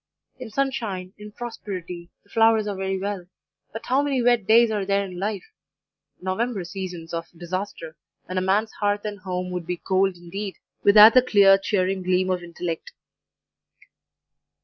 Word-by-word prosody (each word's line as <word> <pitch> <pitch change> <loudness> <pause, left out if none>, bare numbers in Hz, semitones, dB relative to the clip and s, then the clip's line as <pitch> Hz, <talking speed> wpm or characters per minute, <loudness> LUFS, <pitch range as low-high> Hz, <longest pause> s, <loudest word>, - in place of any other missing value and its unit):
In 250 -3 -7
sunshine, 215 -8 -2
in 210 0 -10
prosperity, 185 -7 -7
the 205 - -28
flowers 225 -1 +4
are 205 - -3
very 190 0 -2
well; 195 -2 -4 0.4
but 225 - -8
how 265 +3 +2
many 285 -2 0
wet 240 -4 +2
days 230 +1 +6
are 210 -2 -1
there 200 +1 +1
in 180 -2 -8
life 205 +1 -2 0.8
November 195 +2 -2
seasons 180 -2 -7
of 165 0 -4
disaster, 175 -2 -5 0.3
when 185 0 -2
a - - -2
man's 200 +4 +1
hearth 205 0 0
and 205 -1 -5
home 180 -2 -4
would 180 -2 -5
be 180 0 -2
cold 190 +1 +1
indeed, 190 +3 -6 0.3
without 210 +2 +9
the 255 - +7
clear, 200 -5 +6
cheering 190 -1 0
gleam 185 +1 +1
of 180 -1 -1
intellect. 170 -1 -6
195 Hz, 160 wpm, -24 LUFS, 180-215 Hz, 0.8 s, without